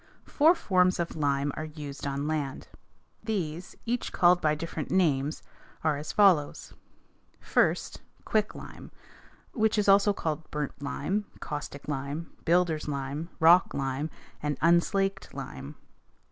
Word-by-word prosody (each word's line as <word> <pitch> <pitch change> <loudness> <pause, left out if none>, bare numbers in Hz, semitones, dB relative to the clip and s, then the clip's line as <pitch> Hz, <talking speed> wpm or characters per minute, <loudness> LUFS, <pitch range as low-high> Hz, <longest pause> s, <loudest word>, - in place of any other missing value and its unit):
Four 315 +4 +4
forms 185 - +2
of 170 - -2
lime 145 -2 0
are 155 - -4
used 145 -2 -7
on 140 +1 -2
land. 150 -4 -3 0.6
These, 180 -6 -3
each 245 +1 -2
called 175 0 +4
by 155 -1 +2
different 160 -1 -5
names, 155 -5 +1 0.4
are 155 -2 +2
as 150 +2 -5
follows: 185 -8 +3 0.7
First, - - 0 0.2
quicklime, 215 -1 -3 0.6
which 220 -2 +1
is 210 - +1
also 200 +1 +6
called 160 -5 -3
burnt 150 -2 -4
lime, 160 +9 -2
caustic 145 -1 -6
lime, 145 +3 -4
builders' 165 -3 +2
lime, 140 +3 -4
rock 170 +3 +6
lime, 135 +2 -2 0.3
and 145 -1 -2
unslaked 195 +4 +1
lime. - - -7
160 Hz, 125 wpm, -28 LUFS, 145-185 Hz, 0.7 s, also